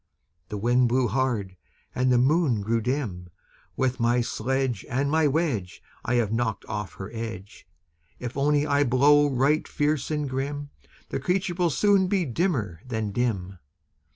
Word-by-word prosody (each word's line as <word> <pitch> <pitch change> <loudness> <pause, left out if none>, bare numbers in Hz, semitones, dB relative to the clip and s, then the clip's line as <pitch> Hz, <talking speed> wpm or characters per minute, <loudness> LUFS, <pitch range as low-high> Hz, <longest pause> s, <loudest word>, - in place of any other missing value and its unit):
The 105 - -4
Wind 120 +3 +3
blew 125 +1 +2
hard, 110 -5 -1 0.4
and 130 0 +1
the 125 - +4
Moon 135 -3 +2
grew 115 +3 0
dim. 110 -8 -3 0.5
"With 130 -1 0
my 120 +1 +2
sledge 125 -1 -1
And 140 +3 0
my 160 -1 +3
wedge 135 - -1 0.2
I 125 - 0
have 115 -3 +1
knocked 115 -1 -1
off 105 -2 -5
her 95 +1 -8
edge! 110 -7 -7 0.5
If 125 -1 -6
only 145 +1 +2
I 145 -1 +2
blow 145 +3 +4
right 140 +4 +1
fierce 150 -2 0
and 150 -2 -1
grim, 140 +2 -4 0.4
The - - -2
creature 180 +5 0
will 175 -1 +1
soon 195 +4 +3
be 185 -2 +1
dimmer 120 - -1
than 110 -4 -3
dim." 100 -5 -2
125 Hz, 155 wpm, -26 LUFS, 110-145 Hz, 0.5 s, the